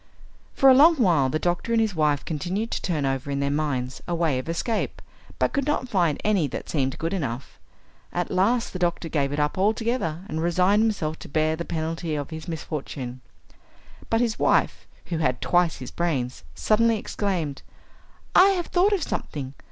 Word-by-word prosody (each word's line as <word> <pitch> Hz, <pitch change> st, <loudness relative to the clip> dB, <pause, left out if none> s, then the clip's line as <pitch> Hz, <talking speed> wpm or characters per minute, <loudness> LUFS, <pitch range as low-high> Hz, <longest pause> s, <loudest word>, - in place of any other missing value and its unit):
For 270 Hz, -, +5 dB
a -, -, +8 dB
long 310 Hz, +6 st, +7 dB
while 170 Hz, -, +3 dB
the 155 Hz, -, 0 dB
doctor 175 Hz, +8 st, -1 dB
and 230 Hz, -, +4 dB
his 220 Hz, -3 st, +1 dB
wife 150 Hz, -3 st, +1 dB
continued 180 Hz, +8 st, -3 dB
to -, -, -2 dB
turn 155 Hz, -6 st, -1 dB
over 135 Hz, +1 st, -2 dB
in 140 Hz, 0 st, -1 dB
their 140 Hz, 0 st, 0 dB
minds 140 Hz, -4 st, -2 dB
a 175 Hz, -, -1 dB
way 160 Hz, -6 st, +1 dB
of 130 Hz, -, -7 dB
escape, 215 Hz, +7 st, -2 dB, 0.4 s
but -, -, +1 dB
could 280 Hz, -1 st, 0 dB
not 295 Hz, -4 st, 0 dB
find 175 Hz, -8 st, +1 dB
any 200 Hz, -8 st, +2 dB
that 125 Hz, -, -6 dB
seemed 135 Hz, -4 st, 0 dB
good 165 Hz, +3 st, -2 dB
enough. 135 Hz, -8 st, -4 dB, 0.5 s
At 175 Hz, 0 st, -2 dB
last 225 Hz, +6 st, +1 dB
the 185 Hz, -, -4 dB
doctor 170 Hz, -1 st, 0 dB
gave 140 Hz, -3 st, 0 dB
it 145 Hz, -, -2 dB
up 150 Hz, +5 st, 0 dB
altogether 215 Hz, -5 st, 0 dB
and 160 Hz, +1 st, -3 dB
resigned 180 Hz, +5 st, +3 dB
himself 180 Hz, -8 st, -1 dB
to -, -, -10 dB
bear 155 Hz, +2 st, +1 dB
the 170 Hz, +1 st, -5 dB
penalty 165 Hz, 0 st, -3 dB
of 145 Hz, +2 st, -4 dB
his 160 Hz, +1 st, -7 dB
misfortune. 140 Hz, -6 st, -5 dB, 0.9 s
But 225 Hz, +1 st, +2 dB
his 235 Hz, -2 st, 0 dB
wife, -, -, +2 dB, 0.2 s
who 165 Hz, -2 st, -3 dB
had 125 Hz, -5 st, +1 dB
twice 175 Hz, -2 st, +2 dB
his 130 Hz, -, -8 dB
brains, 135 Hz, -, -2 dB
suddenly 230 Hz, -, +3 dB
exclaimed, 175 Hz, -10 st, -3 dB, 0.7 s
"I 385 Hz, -, +7 dB
have 350 Hz, -, -2 dB
thought 380 Hz, +4 st, +2 dB
of 380 Hz, -6 st, 0 dB
something! 135 Hz, -, -4 dB
165 Hz, 190 wpm, -25 LUFS, 145-210 Hz, 0.9 s, a